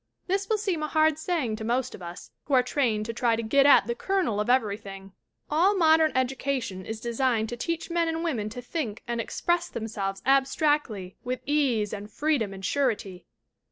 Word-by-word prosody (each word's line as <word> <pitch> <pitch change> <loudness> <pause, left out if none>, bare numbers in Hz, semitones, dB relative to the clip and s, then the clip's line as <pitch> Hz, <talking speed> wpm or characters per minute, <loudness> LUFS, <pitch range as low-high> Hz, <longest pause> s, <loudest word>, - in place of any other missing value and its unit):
This 390 +1 -1
will 440 - +2
seem 385 -6 -1
a 305 - -1
hard 310 0 +2
saying 310 -10 -1
to 220 - -6
most 250 +3 -1
of - - -10
us, 175 0 -9
who 285 - +1
are 250 - +5
trained 235 -5 0
to 230 - -4
try 235 0 +2
to 230 - -3
get 275 +5 +4
at 285 - +7
the 475 - -1
kernel 385 - 0
of 210 +3 -1
everything. 200 -5 -1 0.3
All 355 +7 +3
modern 320 -2 +5
education 260 -7 -1
is 220 0 -4
designed 235 -1 0
to 240 - -4
teach 335 +7 -3
men 335 -1 +1
and 325 0 -2
women 235 -11 -1
to 245 +3 -8
think 245 -6 -4
and 235 -1 -1
express 345 +8 -1
themselves 200 -3 -4
abstractly 270 - +1
with 250 +1 -3
ease 260 -8 +1
and 205 0 -6
freedom 285 -6 0
and 190 0 -7
surety. 210 -10 -1
255 Hz, 190 wpm, -27 LUFS, 215-315 Hz, 0.3 s, at